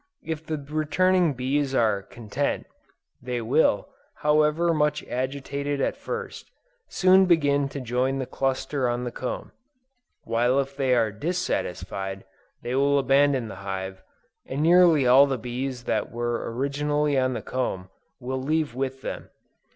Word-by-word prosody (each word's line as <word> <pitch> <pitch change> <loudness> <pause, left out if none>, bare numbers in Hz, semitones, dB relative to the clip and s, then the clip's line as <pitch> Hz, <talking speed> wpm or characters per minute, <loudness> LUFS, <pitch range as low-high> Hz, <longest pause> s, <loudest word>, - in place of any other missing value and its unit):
If 160 -1 -4
the 155 - -2
returning 155 +3 +1
bees 135 +2 0
are 110 -5 +2
content, 120 +7 -3 0.6
they 125 -1 -3
will, 115 -2 +2 0.3
however 150 +3 +2
much 150 -1 +1
agitated 140 +2 -3
at - - 0
first, 470 0 -6 0.4
soon 190 0 +5
begin 145 -5 +3
to 140 - -6
join 130 +2 0
the 130 - -2
cluster 135 0 -1
on 120 +1 -2
the 120 - -3
comb; 125 - -5 0.7
while 120 +4 +2
if 135 0 -3
they 135 -2 +2
are 115 -3 +2
dissatisfied, 95 - -3 0.4
they 120 - -3
will 140 +2 +3
abandon 135 -2 +3
the 95 - -8
hive, 95 -1 -5 0.5
and 140 +3 -2
nearly 170 -4 +6
all 130 +3 +7
the 135 -1 -1
bees 125 +2 -4
that 110 -3 -1
were 120 0 -2
originally 145 +3 0
on 130 -1 +2
the - - -5
comb, 95 -8 -3 0.3
will 130 +1 -3
leave 155 0 0
with 130 +1 -4
them. - - -6
135 Hz, 145 wpm, -25 LUFS, 120-150 Hz, 0.7 s, all